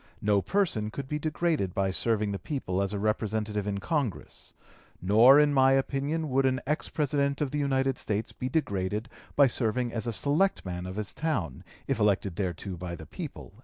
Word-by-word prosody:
No 100 -1 +3
person 165 - 0
could 135 +4 -6
be 150 +2 -2
degraded 155 - -1
by 95 0 +1
serving 105 +1 0
the 100 - -3
people 100 -11 -2
as 100 0 0
a 105 - -2
Representative 105 0 -1
in 100 -1 -1
Congress. 140 - -3 0.5
Nor 115 +9 +7
in 150 -1 +4
my 135 -1 +5
opinion 140 +3 -1
would 135 +1 +3
an 130 0 +1
ex 150 +3 -1
President 140 -2 0
of 145 -3 -1
the 150 - -1
United 135 -2 +1
States 105 +1 -2
be 125 - -4
degraded 105 - -1 0.3
by 140 - +7
serving 120 -1 0
as 115 0 -2
a - - 0
selectman 110 - 0
of 95 - -6
his 105 -1 -4
town, 115 - -2 0.2
if - - -1
elected 100 -3 +1
thereto 95 0 -3
by 85 -1 -5
the 80 - -10
people." - - -8
115 Hz, 185 wpm, -28 LUFS, 100-140 Hz, 0.5 s, Nor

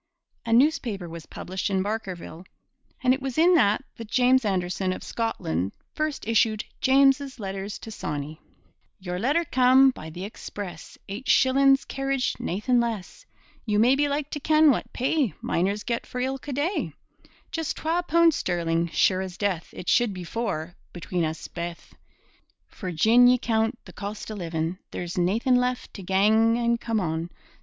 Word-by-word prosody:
A - - -1
newspaper 235 - +2
was 165 -1 -9
published 190 +3 -4
in 190 -1 +1
Barkerville. 190 -5 -5 0.6
And 255 0 +5
it 265 - -3
was 265 -2 -4
in 340 +3 +6
it - - +5 0.4
that 230 -2 -8
James 255 +1 +4
Anderson 185 -2 -1
of - - -8
Scotland 95 - -2 0.2
first 305 -6 -3
issued 220 -1 +2 0.2
Jeames's 270 0 +3
Letters 195 0 -5
to 225 - -10
Sawney. 150 -4 -5 0.6
Your 180 -1 -4
letter 290 - +1
cam' 260 0 +5
by 160 -10 -9
the 175 +4 -6
express, 195 -4 -8
Eight 210 +7 -6
shillin's 270 +1 +4
carriage, 270 -1 -1
naethin' 215 +7 0
less! 235 - -4 0.4
You 210 -2 0
maybe 265 +6 +4
like 285 0 -2
to 295 - -3
ken 310 +1 +5
what 250 - -2
pay 260 - 0
Miners 200 +4 -1
get 235 -1 -3
here - - -21
for 250 - -4
ilka 265 +2 -3
day? 305 +9 -1 0.6
Jus' 325 -2 -2
twa 330 +3 -1
poond 335 -1 +4
sterling', 170 -5 0
sure 185 +3 +2
as 185 -2 -6
death 195 -5 -1
It 180 - -9
should 235 -5 +3
be 180 - -6
four, 175 -5 -3 0.2
between 175 0 -2
us 160 0 -3
baith 170 0 -7 0.7
For 185 -3 -6
gin 225 +9 +5
ye 250 0 +5
coont 225 -1 0
the - - -12
cost 205 +2 -6
o' - - -4
livin', 170 -2 -3
There's 175 0 -4
naethin' 225 +8 +2
left 250 0 -1
to 200 - -8
gang 215 +5 +3
an' 235 0 +1
come 230 -2 -1
on. 165 -2 -2
220 Hz, 165 wpm, -25 LUFS, 180-260 Hz, 0.7 s, in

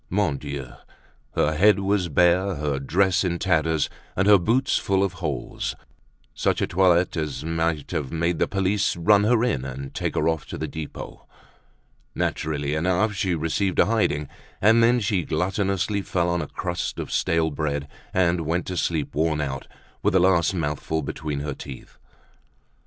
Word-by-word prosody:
Mon 95 -6 +1
Dieu! 70 -2 -6 0.7
her 75 - +2
head 105 +7 +5
was 95 -2 0
bare, 90 +5 +3
her 70 -2 -2
dress 90 +7 +2
in 85 -2 0
tatters, 80 -4 +1 0.3
and 95 +2 +1
her 105 -2 +7
boots 120 +9 +2
full 95 0 +1
of 95 -2 -1
holes—such 75 -7 -4
a - - +2
toilet 90 0 +3
as 75 -4 -3
might 80 -2 -1
have 75 -7 -2
led 85 0 0
the - - +2
police 100 +1 +1
to - - -9
run 100 +4 +4
her 115 +1 +3
in, 110 - 0
and 65 +1 -6
take - - -2
her - - +1
off 80 -2 -1
to - - -6
the - - -3
Depot. 80 -2 -8 0.9
Naturally 75 -2 -1
enough 90 +7 +1
she 95 -3 0
received 85 +4 -1
a - - +6
hiding, 100 -10 +1 0.3
and 110 +3 +5
then 120 +2 +4
she 100 -4 0
gluttonously 95 +4 -1
fell 90 -2 0
on 85 0 0
a - - -4
crust - - -4
of - - -5
stale 80 -1 +1
bread 70 0 -2 0.2
and 90 -2 +2
went 85 +3 -1
to 90 - -4
sleep, 80 -4 -1
worn 80 0 +1
out, 65 -3 -3 0.3
with - - +1
the 95 - +5
last 90 0 +3
mouthful 80 -1 -2
between 75 0 -4
her 75 -1 -3
teeth. 65 -1 -10
85 Hz, 170 wpm, -24 LUFS, 75-95 Hz, 0.9 s, her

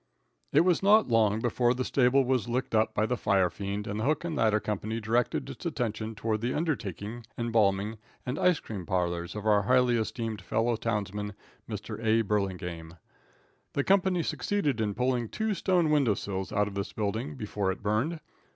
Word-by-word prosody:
It 150 - +5
was 175 0 +3
not 210 -1 +5
long 110 -2 +3
before 120 +1 +2
the 130 +1 -2
stable 135 +1 +3
was 125 -3 0
licked 125 +1 -2
up 110 0 +2
by 105 - +2
the 125 - 0
firefiend, 100 0 0
and 105 +1 -3
the - - -1
hook 150 +4 +1
and 165 -2 -2
ladder 110 -4 +3
company 105 +2 -3
directed 115 +2 0
its - - -9
attention 115 - -3
toward 110 0 -1
the 120 +2 -1
undertaking, 120 - -3
embalming, 110 -2 +1 0.3
and 125 +3 -3
ice 180 -3 +3
cream 95 -6 -7
parlors 85 -1 -1
of 105 0 -5
our 105 -1 +4
highly 125 +2 +3
esteemed 110 -2 -3
fellow 115 +5 0
townsman, 105 -2 -3 0.3
Mr. 115 - -6
A. 115 +1 +3
Burlingame. 90 -5 -3 0.8
The 140 - +1
company 190 -2 +3
succeeded 150 - -1
in 105 -2 -1
pulling 125 -2 0
two 220 -1 -1
stone 180 -4 +2
window 135 -9 +3
sills 95 -2 -4
out 105 0 +1
of 105 - -6
this 100 0 -4
building 110 +8 -2
before 105 -5 -2
it 95 - -7
burned. 115 +11 0
110 Hz, 180 wpm, -29 LUFS, 105-130 Hz, 0.8 s, It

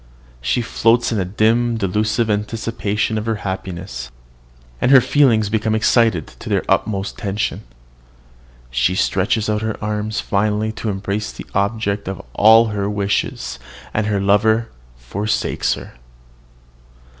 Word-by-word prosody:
She 65 - 0
floats 115 +1 +2
in 110 - 0
a 95 - 0
dim, 115 +5 +2
delusive 110 +3 0
anticipation 110 0 -1
of 110 - -6
her 115 - +1
happiness; 95 -6 -5 0.7
and - - +3
her 135 -1 +9
feelings 120 -6 +3
become 110 0 0
excited 110 -6 +3
to - - -7
their - - +1
utmost 100 +1 0
tension. 105 -1 -2 1.1
She 65 +9 +1
stretches 100 +3 +1
out 105 0 0
her 110 0 -2
arms 105 +1 -2
finally 105 +1 0
to 110 0 -4
embrace 100 +1 -3
the - - -10
object 100 0 -1
of 95 -1 -4
all 110 +2 +6
her 100 -1 -2
wishes 100 -11 -2 0.3
and 110 -1 0
her 105 -2 +1
lover 110 +3 +2 0.3
forsakes 100 - -1
her. - - -10
105 Hz, 135 wpm, -19 LUFS, 100-110 Hz, 1.1 s, her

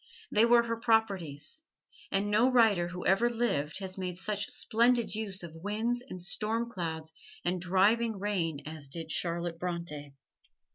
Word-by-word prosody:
They 215 +2 +5
were 235 0 +6
her 230 0 -2
properties, 200 - 0 0.5
and 200 +1 0
no 230 +5 +4
writer 220 -8 +4
who 180 0 -6
ever 225 +6 +4
lived 225 -11 -1
has 190 -1 -6
made 180 -2 -3
such 205 +1 -3
splendid 235 +1 +2
use 200 -4 -4
of 170 -2 -8
winds 215 +8 -1
and 245 -7 -8
storm 220 +6 -1
clouds 160 -5 -4 0.3
and 180 0 0
driving 205 +5 +3
rain 180 -7 -1
as 155 -2 -7
did 160 +3 -5
Charlotte 170 -1 -1
Bronte. 165 -5 -4
190 Hz, 150 wpm, -31 LUFS, 170-225 Hz, 0.5 s, were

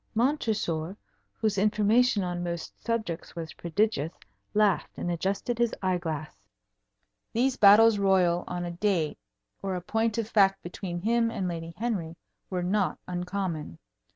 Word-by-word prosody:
Montresor, 215 - 0 0.4
whose 210 -3 0
information 215 +2 +3
on 175 -1 -3
most 170 -1 -5
subjects 220 -10 -3
was 165 -2 -6
prodigious, 170 -3 0 0.4
laughed 210 -3 +3
and 175 - -2
adjusted 195 +7 -1
his 235 -1 +2
eye 185 -1 +1
glass. 155 -3 -4 1.0
These 255 +3 +2
battles 210 +1 +7
royal 185 -3 +3
on 175 0 -3
a 175 - -4
date 170 -4 0 0.4
or 195 -1 -2
a - - -2
point 225 +4 0
of 225 -2 -1
fact 195 -3 +3
between 175 0 -5
him 230 +3 +2
and 190 -5 -2
Lady 165 -1 -5
Henry 200 -8 -2 0.3
were 180 -2 -2
not 190 -2 +1
uncommon. 180 - -3
190 Hz, 140 wpm, -28 LUFS, 175-215 Hz, 1.0 s, battles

